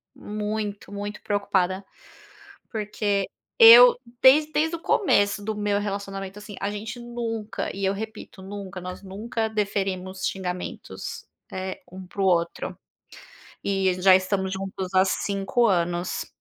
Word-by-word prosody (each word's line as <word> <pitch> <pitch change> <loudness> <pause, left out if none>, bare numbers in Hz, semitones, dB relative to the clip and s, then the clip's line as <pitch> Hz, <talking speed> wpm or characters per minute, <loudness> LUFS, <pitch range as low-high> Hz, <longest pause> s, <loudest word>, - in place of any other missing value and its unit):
muito, 210 -1 -4
muito 205 +1 -5
preocupada. 195 -2 0 0.9
Porque 205 -2 -1 0.3
eu 240 +2 +10 0.2
desde 300 +4 +6
desde 320 +2 +1
o - - -16
começo 205 - +2
do 215 0 -3
meu 205 -1 0
relacionamento, 195 -1 -5
assim, 210 -1 -9
a 200 - 0
gente 215 +4 -6
nunca 230 -4 -4
e 195 0 -2
eu 195 - +2
repito, 220 -2 -8
nunca, 195 -1 -7
nós 180 +2 -7
nunca 220 +3 -3
deferimos 190 -3 -2
xingamentos, 180 -2 -5 0.3
eh, 190 0 -5
um 185 0 -9
para 195 - -5
o - - +3
outro. 170 -2 0 0.9
E 195 -2 +1
já 190 -1 +8
estamos 190 0 -1
juntos 190 -1 -5
há 185 0 +6
5 200 +5 0
anos. 175 -2 0
200 Hz, 130 wpm, -25 LUFS, 190-215 Hz, 0.9 s, eu